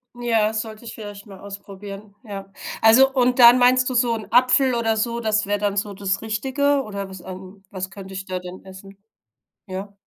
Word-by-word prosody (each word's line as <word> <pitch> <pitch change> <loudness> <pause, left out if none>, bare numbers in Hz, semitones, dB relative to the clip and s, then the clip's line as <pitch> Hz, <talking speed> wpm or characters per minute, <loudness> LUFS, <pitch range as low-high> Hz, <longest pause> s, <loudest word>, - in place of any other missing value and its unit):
Ja, 225 -3 +1
sollte 220 +1 -5
ich 230 - -8
vielleicht 205 -1 -9
mal 195 -2 -12
ausprobieren, 200 +1 -10
ja. 195 -2 -8 0.3
Also, 260 +5 +6
und 250 -1 +2
dann 245 0 +8
meinst 250 +1 +4
du - - -3
so 240 -1 +2
'n 220 -2 -6
Apfel 255 +2 +4
oder 225 -2 0
so, 235 +1 -1
das 215 -2 0
wär 205 +1 -1
dann 205 -1 -1
so 205 0 -1
das 195 0 -2
Richtige 270 +6 0
oder 200 -4 -6
was 190 -2 -10
an 190 +1 -10
was 185 -1 -6
könnte 195 -1 -10
ich 190 0 -5
da 185 -1 -4
denn 180 +1 -10
essen? 190 +1 -13 0.7
Ja? 195 +2 -6
210 Hz, 195 wpm, -22 LUFS, 195-235 Hz, 0.7 s, dann